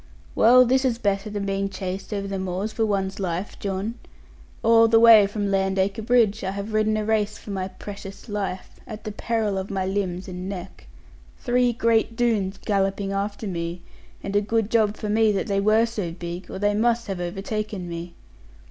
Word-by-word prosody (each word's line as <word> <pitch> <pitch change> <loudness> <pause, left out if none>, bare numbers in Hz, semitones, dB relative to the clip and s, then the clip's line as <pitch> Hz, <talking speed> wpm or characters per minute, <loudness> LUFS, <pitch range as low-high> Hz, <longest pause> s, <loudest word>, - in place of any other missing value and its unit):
Well, 250 +2 +6
this 260 +2 +2
is 250 -3 +1
better 205 -2 -1
than 205 -1 -3
being 195 0 -1
chased 190 +1 -5
over 200 -1 -2
the 195 -1 -3
moors 190 +3 -3
for 225 -1 0
one's 195 -1 -1
life, 185 +1 -3
John. 200 +4 -3 0.6
All 230 0 +6
the 225 0 +5
way 225 -3 +8
from 205 -1 -2
Landacre 195 +1 +1
Bridge, 220 -2 +2
I 190 - -1
have 200 +2 -5
ridden 215 0 +2
a 215 - -2
race 210 -1 0
for 205 - -9
my 190 -1 -2
precious 200 +1 -9
life, 200 -3 -4
at 215 -1 -8
the 215 - -4
peril 215 -2 -1
of 190 - -5
my 190 -1 -1
limbs 190 -2 -2
and 180 0 -6
neck. 190 -1 -8 0.5
Three 245 0 +2
great 230 -1 +1
Doones 210 -5 0
galloping 195 -1 -1
after 200 +2 -3
me, 170 -2 -4 0.4
and 200 - -4
a 205 - +4
good 220 0 0
job 215 -2 +2
for 215 - -4
me 215 +1 +3
that 195 - -1
they 195 -1 0
were 215 +3 +4
so 210 -7 -4
big, 175 +1 -7
or - - -6
they 205 +1 +1
must 235 +2 +1
have 190 -3 -4
overtaken 195 +1 -4
me. 170 0 -7
200 Hz, 190 wpm, -24 LUFS, 190-220 Hz, 0.6 s, way